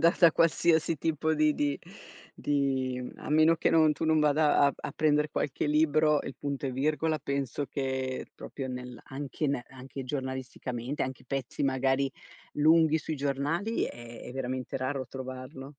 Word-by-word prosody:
da 170 +1 +5
da 170 -3 +7
qualsiasi 165 0 +3
tipo 160 +1 0
di 155 0 +3
di 145 -1 0 0.6
di 130 -3 -1
a - - -9
meno 155 +2 +5
che - - +2
non 160 -2 +5
tu 150 - -4
non 155 -1 +3
vada 150 0 +3
a 140 - +2
a - - -6
prendere 150 0 +2
qualche 140 - -1
libro, 150 0 +3
il 135 - -7
punto 140 -1 -3
e 130 - -1
virgola 155 +4 0
penso 140 0 -2
che 130 -1 -3
proprio 135 -2 -6
nel 125 -1 -6
anche 140 +2 -3
ne 135 -3 -1
anche 130 +1 -8
giornalisticamente, 130 -1 -4
anche 130 0 -5
pezzi 135 0 -2
magari 135 0 +1 0.4
lunghi 160 +1 +4
sui 155 0 -4
giornali 145 +10 -1
è 120 0 -8
è - - -8
veramente 130 0 -3
raro 130 +1 -2
trovarlo. 130 +1 -7
140 Hz, 160 wpm, -29 LUFS, 130-155 Hz, 0.6 s, da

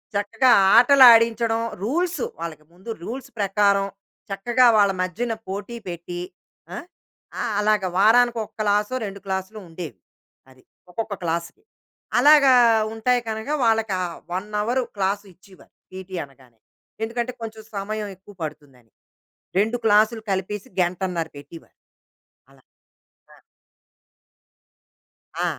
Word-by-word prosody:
చక్కగా 205 +5 +2 0.3
ఆటలాడించడం 230 -3 +6 0.2
రూల్స్, 340 - -1 0.2
వాళ్ళకి 160 -2 -7
ముందు 185 +6 -14
రూల్స్ 255 +6 -7
ప్రకారం 200 0 +2 0.4
చక్కగా 240 +6 +2
వాళ్ళ 200 -1 +4
మజ్యన 225 +6 -2
పోటీ 200 +5 -6
పెట్టి, 175 0 -6 0.5
ఆ! - - -5 0.7
ఆ! - - -1 0.2
అలాగ 210 -1 +2
వారానికొ 230 +3 +4 0.2
క్లాసో, 210 +3 +1
2 200 0 -7
క్లాస్‌లో 190 +3 -4
ఉండేవి. 165 - -8 0.5
అది. 130 0 -21 0.3
ఒక్కొక్క 215 +2 -4
క్లాస్‌కి. 170 0 -4 0.6
అలాగా 285 0 +7 0.4
ఉంటాయి 245 +2 +1
కనక, 220 +3 -5 0.2
వాళ్ళకా 225 -3 +1
ఆ - - -6 0.2
1 190 +3 -4
అవరు 245 +4 0 0.2
క్లాసు 200 +1 -1
ఇచ్చేవారు. 185 +2 -21 0.2
పీటీ 185 0 -8
అనగానే. 130 -4 -23 0.4
ఎందుకంటే, 235 +2 -3
కొంచెం 220 -1 -7 0.2
సమయం 210 +1 -4
ఎక్కువ 195 +2 -17
పడుతుందని. 135 -7 -10 0.7
2 220 +4 +1
క్లాస్‌లు 220 +1 +3
కలిపేసి, 195 +4 -3
గంటన్నర 175 -1 -2
పెట్టీవారు. 145 +4 -14 0.7
అలా. 135 -1 -23 0.7
ఆ! - - -19 2.0
ఆ! - - +1
205 Hz, 110 wpm, -23 LUFS, 185-230 Hz, 2.0 s, అలాగా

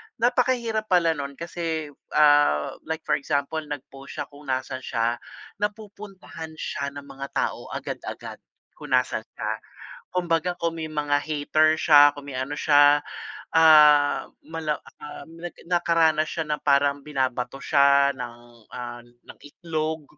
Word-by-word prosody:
Napakahirap 235 -2 +1
pala 170 -2 +4
nun 140 -2 -6
kasi, 165 -3 -4 0.2
ah, 145 - +4 0.2
like 160 0 -4
for - - +3
example 145 +2 -2
nag-post 140 -2 -9
siya - - -2
kung 145 -1 -14
nasaan 130 0 -3
siya. 115 0 0 0.5
Napupuntahan 205 -5 -6
siya 140 -2 -3
ng 140 0 -10
mga 140 0 -8
tao - - -2
agad-agad - - -6 0.4
kung - - -11
nasaan - - +1
siya. - - -3 0.6
Kumbaga 175 -1 0
kung 165 -1 -2
may 155 - -4
mga 145 -1 0
hater 155 +1 +2
siya, 145 -2 +7
kung 145 - -9
may - - -7
ano 130 +3 -3
siya, 145 -1 +5 0.6
ah, 150 -2 +6 0.2
malam 160 -2 -3 0.2
um, 145 0 -9
nagka 175 0 -8
nakaranas 165 -3 +2
siya 165 - -3
na 150 - 0
parang 140 0 +2
binabato 130 -3 -2
siya 140 -1 +4
ng, 120 -2 -6 0.4
ah, 120 -1 -6
ng 120 0 -17
itlog 155 0 -4
150 Hz, 135 wpm, -25 LUFS, 140-165 Hz, 0.6 s, siya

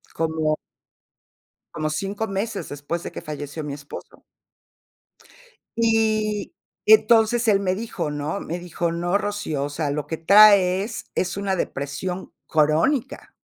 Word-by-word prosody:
Como 160 -1 0 1.2
Como 155 0 -2
5 200 +7 -3
meses 200 +1 -3
después 145 +4 -4
de - - -7
que - - -8
falleció 150 -1 -6
mi 145 -1 -5
esposo. 145 0 -10 1.5
Y, 220 0 +1 0.3
entonces, 240 - +5
él 205 -2 +4
me 185 -2 0
dijo, 215 -7 -4
¿no? 150 +6 -3
Me 170 +2 -5
dijo: 175 -1 -3
"No, 175 +3 0
Rocío, 205 -9 -3
o 145 - -3
sea, 145 0 -2
lo 145 +1 -2
que 160 - -4
traes 200 +2 +5
es 180 -1 -1
una 200 -1 -1
depresión 175 +4 -4
crónica". 160 - +1
180 Hz, 130 wpm, -23 LUFS, 155-210 Hz, 1.5 s, entonces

